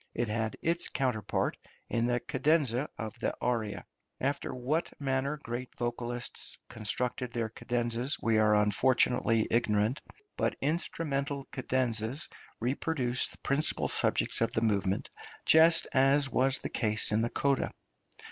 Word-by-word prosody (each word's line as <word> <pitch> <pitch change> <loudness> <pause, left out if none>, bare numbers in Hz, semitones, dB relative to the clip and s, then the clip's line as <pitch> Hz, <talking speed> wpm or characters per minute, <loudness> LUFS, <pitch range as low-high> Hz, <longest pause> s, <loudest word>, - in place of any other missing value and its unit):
It 120 -2 -1
had 110 0 -2
its 170 +1 +1
counterpart 125 -7 -1 0.3
in 115 0 0
the 120 0 +1
cadenza 140 -1 +1
of 110 -2 -5
the - - -1
aria. 110 -6 -2 0.3
After 140 +2 -1
what 135 +7 -1
manner 135 +1 -1
great 120 +2 -4
vocalists 120 0 -3
constructed 120 +3 -2
their 115 -2 -1
cadenzas 120 +3 -1
we 110 -1 +2
are 105 0 +4
unfortunately 115 +1 +3
ignorant, 110 +2 +1 0.4
but - - 0
instrumental 145 -2 -2
cadenzas 125 +1 -1 0.3
reproduced 125 0 0
the - - -16
principal 140 +3 +2
subjects - - +1
of 115 - +2
the 110 - 0
movement, 100 -3 0 0.4
just 165 +1 +6
as 135 +1 +4
was 135 +1 +2
the - - -5
case 110 -2 +2
in 110 +1 +2
the 115 - 0
coda. 140 +1 +1
125 Hz, 130 wpm, -30 LUFS, 115-140 Hz, 0.4 s, just